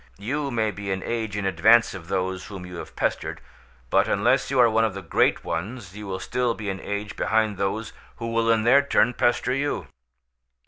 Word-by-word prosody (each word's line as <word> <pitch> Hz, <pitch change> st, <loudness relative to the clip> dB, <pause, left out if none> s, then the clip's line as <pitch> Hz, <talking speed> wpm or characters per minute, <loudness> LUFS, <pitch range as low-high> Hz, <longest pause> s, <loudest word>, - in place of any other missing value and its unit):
You 140 Hz, +8 st, -2 dB
may 110 Hz, -4 st, 0 dB
be 100 Hz, 0 st, -7 dB
an 95 Hz, 0 st, -2 dB
age 110 Hz, -3 st, -3 dB
in 100 Hz, -, -2 dB
advance 110 Hz, +6 st, +4 dB
of 85 Hz, -4 st, -9 dB
those 95 Hz, 0 st, -2 dB
whom 95 Hz, -3 st, -8 dB
you 90 Hz, -1 st, -8 dB
have -, -, -9 dB
pestered, -, -, -2 dB, 0.5 s
but -, -, +4 dB
unless -, -, +2 dB
you 135 Hz, -1 st, +1 dB
are 120 Hz, -, +7 dB
one 115 Hz, 0 st, +2 dB
of 110 Hz, -3 st, 0 dB
the 100 Hz, -, -6 dB
great -, -, +2 dB
ones 100 Hz, +3 st, -5 dB
you 105 Hz, -1 st, -7 dB
will 95 Hz, -1 st, -3 dB
still 125 Hz, -2 st, -1 dB
be 105 Hz, -2 st, -3 dB
an 95 Hz, -, -6 dB
age 100 Hz, +1 st, -4 dB
behind 110 Hz, -2 st, +1 dB
those 105 Hz, +3 st, -2 dB, 0.2 s
who 115 Hz, -1 st, -5 dB
will 115 Hz, 0 st, +1 dB
in 115 Hz, -1 st, +3 dB
their 130 Hz, +5 st, +6 dB
turn 125 Hz, -3 st, +2 dB
pester 120 Hz, +1 st, +1 dB
you. 145 Hz, +2 st, -1 dB
110 Hz, 210 wpm, -24 LUFS, 95-120 Hz, 0.5 s, are